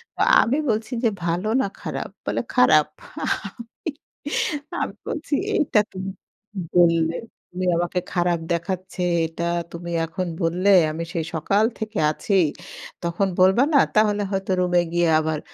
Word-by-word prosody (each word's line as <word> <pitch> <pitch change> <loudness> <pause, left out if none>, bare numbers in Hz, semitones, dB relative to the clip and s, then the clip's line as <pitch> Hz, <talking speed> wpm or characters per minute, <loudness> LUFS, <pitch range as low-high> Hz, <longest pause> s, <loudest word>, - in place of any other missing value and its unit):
তো - - -3 0.2
আমি 265 +6 +1
বলছি 220 +2 -1
যে 230 - +4 0.2
"ভালো 175 +5 0
না - - 0
খারাপ?" - - -4 0.2
বলে - - -1
"খারাপ।" - - +5 0.3
আমি, 235 +7 -4 0.9
আমি - - -3
বলছি 300 -2 -4 0.2
"এটা 275 -9 +3
তুমি 190 +1 -5 0.7
বললে, 165 -1 +4 0.3
তুমি 180 +1 -4
আমাকে 175 +1 0
খারাপ 175 -1 +1
দেখাচ্ছে। 185 +1 -4 0.3
এটা 165 +1 -6 0.3
তুমি 170 0 -7
এখন 180 +2 -4
বললে? 180 +4 +1 0.2
আমি 165 +2 -4
সেই 165 -2 -1
সকাল 200 +7 +2 0.2
থেকে 220 -1 -4
আছি। 200 - -3 0.7
তখন 175 +3 0
বলবা 190 +7 +5
না - - +7 0.2
তাহলে 210 -1 +3
হয়তো 195 0 -2
রুমে 180 -1 +3
গিয়ে 175 -1 +3
আবার 155 -1 -1
180 Hz, 140 wpm, -23 LUFS, 170-210 Hz, 0.9 s, না